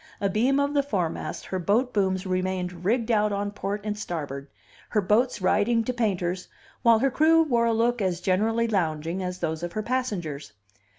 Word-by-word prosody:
Abeam 220 Hz, +8 st, +2 dB
of 285 Hz, +1 st, +1 dB
the 285 Hz, -, +3 dB
foremast 195 Hz, -, -3 dB
her 185 Hz, -, -3 dB
boat 225 Hz, +8 st, +1 dB
booms 190 Hz, -2 st, 0 dB
remained 185 Hz, -1 st, -2 dB
rigged 230 Hz, +4 st, +1 dB
out 210 Hz, -1 st, +2 dB
on 200 Hz, 0 st, -2 dB
port 205 Hz, 0 st, -4 dB
and 210 Hz, -1 st, -2 dB
starboard, 145 Hz, -9 st, -5 dB, 0.4 s
her 215 Hz, -, +2 dB
boats 210 Hz, +2 st, +1 dB
riding 225 Hz, +4 st, +3 dB
to 250 Hz, -, -2 dB
painters, 185 Hz, -6 st, -1 dB, 0.3 s
while 235 Hz, -2 st, +6 dB
her 270 Hz, +4 st, +1 dB
crew 325 Hz, +4 st, +5 dB
wore 235 Hz, -6 st, +2 dB
a -, -, +3 dB
look 235 Hz, +1 st, +1 dB
as 180 Hz, -3 st, 0 dB
generally 220 Hz, +6 st, +1 dB
lounging 170 Hz, -3 st, -1 dB
as 180 Hz, 0 st, -3 dB
that 160 Hz, -2 st, -3 dB
of 175 Hz, 0 st, -4 dB
her 215 Hz, -, -2 dB
passengers. 180 Hz, -, -3 dB
205 Hz, 180 wpm, -26 LUFS, 180-235 Hz, 0.4 s, while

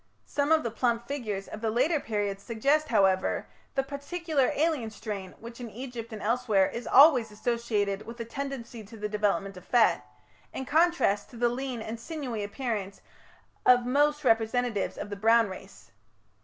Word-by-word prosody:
Some 285 Hz, +1 st, -1 dB
of 320 Hz, -1 st, +4 dB
the 235 Hz, -, -2 dB
plump 235 Hz, 0 st, 0 dB
figures 215 Hz, -9 st, -4 dB
of 215 Hz, -, -8 dB
the 225 Hz, -, 0 dB
later 270 Hz, +8 st, +2 dB
period 205 Hz, -5 st, -2 dB
suggest, 275 Hz, +9 st, +1 dB
however, 190 Hz, -7 st, +2 dB, 0.3 s
"the 270 Hz, -, +2 dB
particular 285 Hz, +1 st, -1 dB
alien 300 Hz, -7 st, +1 dB
strain" 205 Hz, -4 st, -6 dB
which 235 Hz, +1 st, -10 dB
in 235 Hz, -, -6 dB
Egypt 235 Hz, 0 st, -7 dB
and 215 Hz, -2 st, -7 dB
elsewhere 220 Hz, -3 st, +2 dB
"is 235 Hz, -, -6 dB
always 265 Hz, -5 st, +7 dB
associated 210 Hz, -2 st, -1 dB
with 235 Hz, +1 st, -9 dB
a 230 Hz, -, -4 dB
tendency 250 Hz, -3 st, -6 dB
to 225 Hz, +3 st, -12 dB
the 210 Hz, 0 st, -3 dB
development 200 Hz, -2 st, -1 dB
of 180 Hz, -, -11 dB
fat", -, -, +3 dB, 0.5 s
in 265 Hz, -, -4 dB
contrast 305 Hz, -, +2 dB
to 240 Hz, -, -12 dB
"the 240 Hz, +1 st, +2 dB
lean 250 Hz, -2 st, -4 dB
and 225 Hz, +1 st, -6 dB
sinewy 260 Hz, -7 st, -4 dB
appearance 205 Hz, -3 st, -4 dB, 0.6 s
of 245 Hz, -1 st, +5 dB
most 295 Hz, +4 st, +2 dB
representatives 225 Hz, -2 st, +1 dB
of 205 Hz, -, -6 dB
the -, -, -3 dB
Brown 225 Hz, +1 st, +4 dB
race". 190 Hz, -10 st, -11 dB
235 Hz, 170 wpm, -28 LUFS, 210-270 Hz, 0.6 s, always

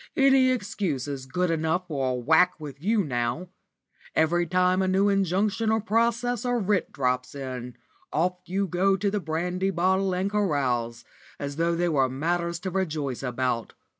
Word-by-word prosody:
Any 270 Hz, -1 st, +5 dB
excuse 195 Hz, -, -2 dB
is 135 Hz, -2 st, -5 dB
good 180 Hz, +4 st, 0 dB
enough 165 Hz, +3 st, 0 dB
for 135 Hz, -5 st, -1 dB
a 125 Hz, -, 0 dB
whack 160 Hz, +9 st, +3 dB
with 145 Hz, -2 st, -9 dB
you 210 Hz, +3 st, +2 dB
now. 125 Hz, +5 st, -2 dB, 0.7 s
Every 170 Hz, +2 st, +2 dB
time 185 Hz, 0 st, +2 dB
a 190 Hz, -, +1 dB
new 195 Hz, +2 st, +3 dB
injunction 195 Hz, +3 st, +1 dB
or 220 Hz, 0 st, +3 dB
process 235 Hz, +3 st, 0 dB
or 245 Hz, -1 st, +1 dB
writ 205 Hz, -3 st, 0 dB
drops 125 Hz, -2 st, -1 dB
in, 130 Hz, -3 st, -6 dB, 0.3 s
off 180 Hz, +4 st, 0 dB
you 195 Hz, +2 st, 0 dB
go 190 Hz, +2 st, +2 dB
to 200 Hz, +1 st, 0 dB
the 210 Hz, -, 0 dB
brandy 180 Hz, +3 st, -1 dB
bottle 190 Hz, +1 st, +1 dB
and 185 Hz, +2 st, 0 dB
carouse, 130 Hz, -, 0 dB, 0.4 s
as 140 Hz, 0 st, -5 dB
though 170 Hz, +1 st, +1 dB
they 175 Hz, +1 st, +1 dB
were 135 Hz, -5 st, +2 dB
matters 170 Hz, +5 st, -1 dB
to 185 Hz, -, -3 dB
rejoice 155 Hz, -9 st, -2 dB
about. 125 Hz, -2 st, -2 dB
175 Hz, 165 wpm, -26 LUFS, 140-195 Hz, 0.7 s, Any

